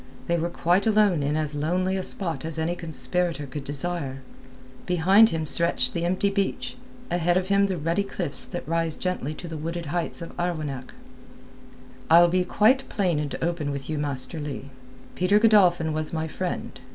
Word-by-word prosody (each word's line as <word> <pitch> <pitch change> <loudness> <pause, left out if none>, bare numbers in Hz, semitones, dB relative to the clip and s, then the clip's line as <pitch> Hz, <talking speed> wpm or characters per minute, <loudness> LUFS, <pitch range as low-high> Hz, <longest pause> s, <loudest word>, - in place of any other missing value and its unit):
They 170 - +1
were 170 +1 -1
quite 175 +4 +1
alone 210 -7 +3
in 145 +2 0
as 155 -1 -1
lonely 180 +6 0
a 190 - -1
spot 165 -7 -3
as 160 0 -4
any 160 +2 -1
conspirator 170 -1 -1
could 140 +1 -6
desire. 140 -2 -4 0.6
Behind 190 +5 +5
him 160 -4 -2
stretched 170 +3 +2
the 170 -1 -1
empty 185 +3 +1
beach, 200 -1 -2 0.4
ahead 175 0 +2
of 185 +1 -1
him 200 0 +4
the 190 -2 -2
ruddy 165 +5 0
cliffs 180 -6 -3
that - - -6
rise 165 -1 0
gently 170 -5 -3
to 175 - -8
the 160 -1 -6
wooded 165 +2 -4
heights 170 +3 -1
of 165 - -10
Arwenack. 155 -7 -3 1.1
"I'll 170 +1 +7
be 180 +1 +2
quite 220 +8 +2
plain 180 -7 0
and 150 -2 -3
open 165 -3 -1
with 140 +1 -5
you, 155 - -2
Master 145 +2 -1
Leigh. 140 -2 -6 0.4
Peter 185 +3 +3
Godolphin 185 -7 +4
was 155 0 -2
my 160 0 -1
friend. 180 +3 -4
170 Hz, 175 wpm, -25 LUFS, 155-185 Hz, 1.1 s, I'll